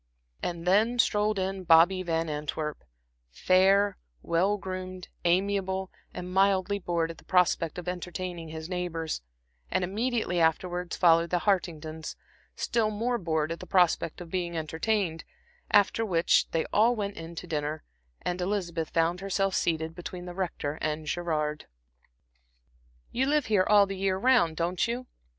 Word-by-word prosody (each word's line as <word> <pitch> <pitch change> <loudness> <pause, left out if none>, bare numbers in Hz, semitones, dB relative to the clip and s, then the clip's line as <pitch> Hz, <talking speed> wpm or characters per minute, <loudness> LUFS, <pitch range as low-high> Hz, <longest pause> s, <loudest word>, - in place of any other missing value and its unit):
And 170 -1 -4
then 215 +6 +3
strolled 210 -2 +2
in 190 0 -2
Bobby 175 +2 +5
Van 165 -2 -1
Antwerp, 150 0 -4 0.5
fair, 190 - +3 0.2
well 185 +5 +2
groomed, 185 -1 -6 0.2
amiable, 190 +1 +1 0.2
and 180 0 -7
mildly 195 +1 +2
bored 170 -3 -1
at 165 - -13
the - - -18
prospect 180 -3 +2
of 180 0 -7
entertaining 180 -1 -4
his 160 0 -6
neighbors; 170 - -3 0.5
and - - 0
immediately 215 -1 -1
afterwards 175 +2 0
followed 170 -1 +4
the 175 -1 0
Hartingtons, 160 -5 -1 0.4
still 225 -2 0
more 235 +3 -1
bored 160 -3 -1
at 165 - -4
the 185 - -9
prospect 175 -2 +2
of 170 -2 -9
being 175 -2 -2
entertained; 165 +2 -1 0.5
after 205 +2 +4
which 175 -6 +2
they 165 - 0
all 230 +4 +4
went 205 -2 -3
in 165 +1 -8
to 175 - -6
dinner, 155 -1 -3 0.4
and 180 0 -2
Elizabeth 180 -4 -2
found 165 +2 +1
herself 195 0 0
seated 160 -2 0
between 175 +1 -7
the 180 - -7
Rector 170 -5 -3
and 155 0 -2
Gerard. 150 -3 -2 1.4
"You 260 +2 0
live 295 -1 +2
here 200 -4 +2
all 205 -1 +7
the 195 0 -5
year 190 0 0
round, 195 -8 +3
don't 175 +5 0
you?" 245 +2 -3
180 Hz, 150 wpm, -28 LUFS, 165-195 Hz, 1.4 s, all